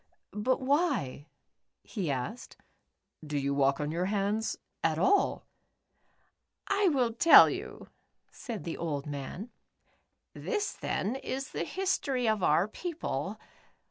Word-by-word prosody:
"But 240 +6 0
why," 265 - 0 0.6
he 190 -8 -4
asked, 140 - -4 0.4
" - - -30
do 145 - 0
you 140 0 0
walk 140 0 +2
on 150 0 -2
your 175 +3 -1
hands 205 +2 -1 0.3
at - - +2
all? 405 - +2 0.6
" - - -43
"I 400 -1 +3
will 250 -6 +1
tell 325 +8 +8
you," - - -7 0.4
said 230 -6 -7
the 165 - -4
old 145 -4 -3
man. 150 - -6 0.8
"This 415 -3 -2
theri 240 - -2
is 270 +1 -4
the - - -3
history 280 -10 -1
of 215 -2 +1
our 170 +3 +3
people. 335 +8 -4
215 Hz, 130 wpm, -30 LUFS, -, 0.8 s, tell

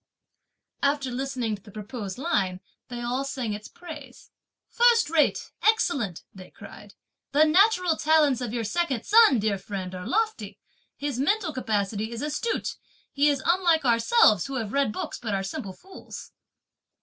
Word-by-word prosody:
After 280 -2 0
listening 250 -3 -2
to 200 - -16
the 205 - -15
proposed 210 -1 -7
line, 200 - -1 0.3
they 245 -1 -6
all 245 +3 -1
sang 260 -5 -3
its 210 +1 -7
praise. 300 -7 -12 0.4
"First 470 -6 +3
rate! 320 -3 +1
excellent!" 275 - +1
they 185 -1 -12
cried, - - -13 0.4
"the 300 +2 +5
natural 365 +1 +4
talents 300 -5 +3
of 240 -3 -3
your 235 -1 -2
second 265 +1 -1
son, 440 - +6
dear 205 -2 0
friend, 190 -2 -6
are 180 0 -6
lofty; 440 +1 -2 0.4
his 280 -3 -3
mental 350 +3 0
capacity 215 -2 -2
is 235 +3 -5
astute; 305 +10 -2 0.3
he 290 +1 +3
is 280 -2 -1
unlike 340 -4 +3
ourselves, 230 - +4
who 275 - -5
have 225 -4 -4
read 280 -5 +1
books - - -5
but 220 -4 -3
are 195 - -2
simple 195 0 -5
fools." 380 - -11
265 Hz, 155 wpm, -26 LUFS, 215-320 Hz, 0.4 s, son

